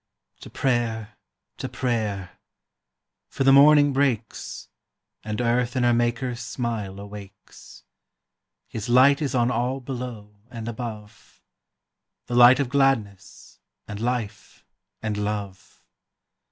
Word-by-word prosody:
To - - -11
prayer, 115 -4 -1 0.4
to - - -5
prayer; 105 -7 -3 0.9
for - - -2
the 135 0 +6
morning 145 0 +6
breaks, 130 -5 -2 0.6
And 105 +1 -4
earth 120 0 0
in 125 - +1
her 120 0 +4
Maker's 120 +1 -1
smile 110 -8 -4
awakes. 100 -1 -12 0.8
His 110 0 -6
light 135 +4 +5
is 140 -3 -2
on 120 0 +2
all 125 +3 -1
below 120 -5 -7
and 115 -2 -7
above, 110 - -8 0.8
The 120 - -7
light 120 +2 +7
of 140 - +1
gladness, 115 -8 -1 0.3
and 105 -1 -7
life, 115 -3 -4 0.4
and 110 -1 -2
love. 105 -2 -5
120 Hz, 115 wpm, -24 LUFS, 105-125 Hz, 0.9 s, light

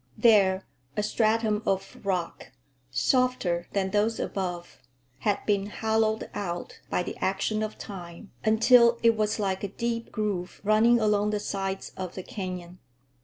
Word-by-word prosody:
There 195 -5 +4 0.3
a 210 - +1
stratum 215 0 +1
of 195 +1 -2
rock, 180 -8 -3 0.4
softer 250 -10 +1
than 190 -1 0
those 210 +2 +1
above, 175 -5 -4 0.4
had 205 -2 0
been 200 -1 +1
hollowed 220 +1 0
out 175 -4 -5
by 180 - 0
the - - -5
action 195 +3 0
of 215 0 -3
time 180 0 -9
until 235 +2 +6
it 230 -1 +5
was 215 -1 0
like 195 -2 -1
a - - 0
deep 230 +3 -3
groove 200 -5 -3
running 220 +3 +5
along 210 -1 +2
the 210 0 0
sides 195 -1 -3
of 185 -2 -5
the 185 - -5
canyon. 180 -3 -6
205 Hz, 145 wpm, -27 LUFS, 190-220 Hz, 0.4 s, until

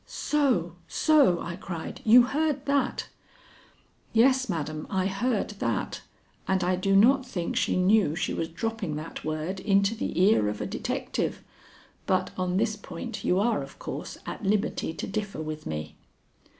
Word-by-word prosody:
'" - - -37 0.3
"So! 220 - +2
so!" 285 - +4
I 170 - -5
cried, 170 -3 -6
"you 240 +3 +8
heard 290 +1 0
that?" 280 -1 0 1.1
"Yes, 260 +2 +4
madam, 155 -3 -3
I 190 -1 0
heard 205 +3 0
that, 115 -2 -2 0.5
and 190 -1 +1
I 180 +1 +2
do 195 +2 +1
not 260 +7 +6
think 185 -9 -4
she - - +1
knew 185 -3 +3
she 175 - -1
was 165 - -2
dropping 215 -2 -3
that 155 +2 -6
word 155 +5 -3
into 200 +2 +2
the 220 - -3
ear 185 - +4
of 105 - -4
a - - -2
detective, - - -3 0.6
but 185 -1 +1
on 185 0 -1
this 215 +1 +1
point 180 -5 -7
you 180 - +2
are, 230 +4 +2
of - - -10
course, - - -6
at - - -6
liberty 200 -4 0
to - - -5
differ 205 -3 -4
with 155 0 -5
me." 75 0 -5
195 Hz, 165 wpm, -27 LUFS, 170-225 Hz, 1.1 s, you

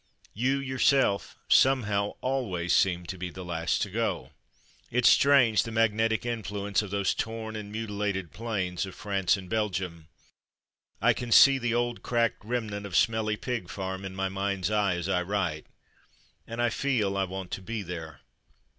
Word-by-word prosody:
You 130 +6 +1
yourself, 130 -5 +1
some 135 -1 +5
how, 100 -1 -1
always 115 -10 -1
seem 90 -2 +2
to 95 +1 -6
be 90 0 -4
the 90 +1 -9
last 85 -1 -1
to 100 - -5
go. 115 +2 -2 0.6
It's 125 0 +3
strange, 125 -7 +5
the 115 - -5
magnetic 110 0 +1
influence 105 -4 -1
of 105 - -6
those 100 0 0
torn 110 -1 -4
and 105 -1 -6
mutilated 105 -5 -3
plains 95 -5 -3
of 95 - -10
France 100 -3 0
and 95 -1 -9
Belgium. 95 -6 -2 1.0
I - - +5
can 120 -1 -6
see 135 +3 +8
the 120 -1 0
old 120 0 -1
cracked 115 -3 0
remnant 105 -3 -3
of 90 - -6
Smelly 110 -2 +2
Pig 115 -6 -4
Farm 95 0 -5
in 95 -1 -6
my 95 0 -1
mind's 100 0 -2
eye 105 -4 +2
as 90 0 -3
I 95 -2 +1
write, 90 -5 -2 0.8
and 115 +1 -6
I 120 - +2
feel 110 -7 0
I 95 0 +1
want 95 -1 -7
to - - -4
be 110 +2 -4
there. 80 -5 -7
105 Hz, 170 wpm, -28 LUFS, 95-115 Hz, 1.0 s, see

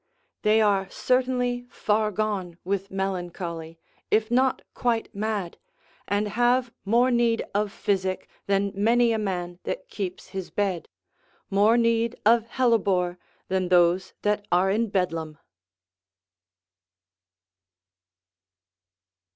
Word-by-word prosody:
They 215 +1 +4
are 195 -2 +2
certainly 250 0 0
far 215 -1 0
gone 195 -4 -2
with 195 +1 -2
melancholy, 175 -4 -4 0.3
if 215 +1 +2
not 260 +1 +2
quite 235 -3 -1
mad, 205 -4 -3 0.5
and 205 +1 0
have 240 +2 +2
more 240 +5 +3
need 235 -1 +2
of 205 0 0
physic 190 -2 -1 0.2
than 200 0 +1
many 230 +4 +3
a 220 - 0
man 180 -4 -3
that - - -5
keeps 185 -3 -5
his 190 -2 -5
bed, 195 -4 -2 0.6
more 210 +4 +4
need 230 0 +1
of 230 +1 +4
hellebore 195 -8 +1 0.3
than 185 -1 0
those 180 +1 +3
that 205 0 0
are 185 +2 +3
in 225 +3 +1
Bedlam. 165 -5 -2
205 Hz, 110 wpm, -25 LUFS, 185-230 Hz, 0.6 s, They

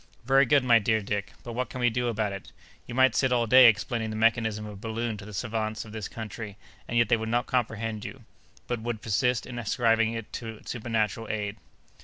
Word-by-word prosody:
"Very 135 +1 +5
good, 140 +1 +4
my 120 -2 +6
dear 110 +1 +2
Dick; 100 -1 -3
but 120 -2 -6
what 125 +2 -2
can 125 - -7
we 120 -1 +3
do 125 +1 -1
about 110 -3 -1
it? 100 - -9 0.4
You 120 - -6
might 130 0 +5
sit 130 -2 +2
all 120 -1 +3
day 125 +2 +8
explaining 110 +1 +1
the 110 - -4
mechanism 110 -1 +1
of 105 - -7
a - - -10
balloon 115 +2 -3
to 100 - -10
the 105 - -9
savants 110 +1 -3
of 105 - -11
this 110 -3 -5
country, 110 -2 -7 0.3
and 120 - -1
yet 120 - +4
they 120 - +3
would 110 0 -4
not 120 +1 +1
comprehend 110 -3 -2
you, 115 +4 -8 0.4
but 120 -2 -3
would 115 -2 -4
persist 125 +3 +1
in 120 -1 -6
ascribing 115 0 +2
it 115 -2 -7
to 115 -2 -6
supernatural 115 -2 -2
aid." 105 -1 -3
115 Hz, 225 wpm, -27 LUFS, 110-120 Hz, 0.4 s, day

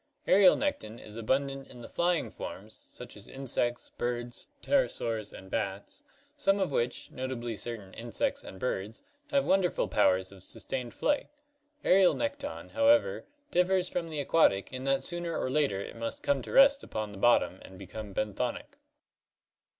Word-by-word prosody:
Aerial 190 -1 +7
nekton 120 - -2
is 105 - -11
abundant 135 +4 -1
in 125 - -12
the - - -8
flying 175 -1 0
forms, - - -8
such - - -11
as - - -12
insects, 120 -2 -2
birds, 120 0 -3
pterosaurs, 115 - 0
and 95 0 -12
bats, 100 -2 -3 0.3
some 195 0 +2
of 190 -6 0
which, 120 -2 -1
notably 125 -3 -4
certain 105 -4 -6
insects 115 0 -2
and 95 - -10
birds, 110 -2 -3 0.3
have 280 -2 +2
wonderful 190 -2 +2
powers 95 -2 +2
of 95 -2 -14
sustained 125 +4 -5
flight. 290 0 +1 0.6
Aerial 185 0 +5
nekton, 285 0 -4
however, 285 0 +3 0.3
differs 180 0 +2
from 175 -2 -2
the 155 -2 -4
aquatic 135 -9 +3
in 130 +1 -5
that 135 0 +2
sooner 175 -1 -3
or 130 - -1
later 140 -9 +1
it 100 - -7
must 115 0 -4
come 140 -2 +2
to - - -8
rest 275 +1 +7
upon 110 -1 -4
the 100 - -10
bottom 110 -5 +3
and 95 - -12
become 100 +2 -8
benthonic. 105 +5 -3
125 Hz, 160 wpm, -30 LUFS, 110-180 Hz, 0.6 s, Aerial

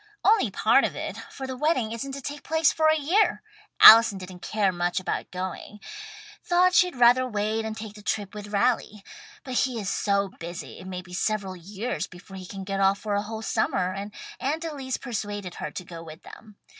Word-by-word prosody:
"Only 440 +3 +4
part - - +3
of - - -1
it, - - -5
for 270 - -8
the 260 0 -5
wedding 260 -5 0
isn't 270 +4 -5
to 275 - -6
take 290 +2 -6
place 320 -2 +2
for 315 0 +2
a 315 0 +4
year. 360 +9 +2 0.4
Allison 225 -2 +10
didn't 185 -1 -10
care 205 -1 0
much 175 +1 -1
about 185 - -3
going 185 +3 -6 0.6
thought 360 +1 +3
she'd 360 -2 +4
rather 245 +1 +5
wait 215 +1 -1
and 220 0 -5
take 215 -2 -7
the 210 - -13
trip 205 -2 -3
with 210 -1 -8
Raleigh. 210 0 0 0.4
But 260 - -6
he 250 -1 0
is 200 -2 -3
so 200 -1 0
busy 170 0 -7
it 185 - -10
may 180 -1 -6
be 180 -1 -13
several 195 0 -1
years 190 0 -4
before 190 +2 -13
he 185 -1 -9
can 195 0 -7
get 195 0 -3
off 195 0 +3
for 210 0 -4
a 205 - +1
whole 220 +1 -6
summer, 185 -3 0
and 200 +2 -6 0.3
Aunt 310 +5 -2
Elise 275 -5 -4
persuaded 205 -6 -5
her - - -3
to 180 - -8
go 170 -2 -9
with 160 0 -12
them. 215 -2 -14
210 Hz, 205 wpm, -26 LUFS, 190-255 Hz, 0.6 s, Allison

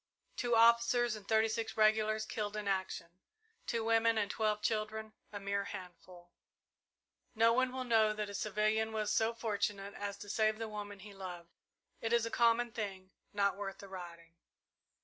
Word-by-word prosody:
Two 240 -2 +1
officers 235 +1 +5
and 205 -2 -11
thirty 220 0 +4
six 225 0 -3
regulars 215 0 +3
killed 210 -1 -3
in 210 -1 -4
action, 190 -2 -3 0.5
two 230 -1 -1
women 225 0 +3
and 205 -2 0
twelve 215 -1 0
children 220 0 -2 0.2
a 205 - -5
mere 200 0 -1
handful. 180 -2 -10 1.0
No 230 +1 +5
one 255 +1 +2
will 260 0 -3
know 225 -3 +4
that 210 0 -3
a 200 - -8
civilian 215 +2 0
was 215 -1 0
so 225 +1 +2
fortunate 205 -3 -2
as 200 0 -5
to 205 - -10
save 215 +1 +1
the 225 0 -4
woman 205 -2 -7
he 205 +1 -11
loved. 180 -3 -8 0.5
It 225 +1 -1
is 235 -1 +3
a 230 - -4
common 235 0 +3
thing 195 -4 -5 0.2
not 200 -1 +1
worth 195 -1 -5
the 200 - -11
writing." 170 -3 -9
215 Hz, 170 wpm, -34 LUFS, 200-225 Hz, 1.0 s, officers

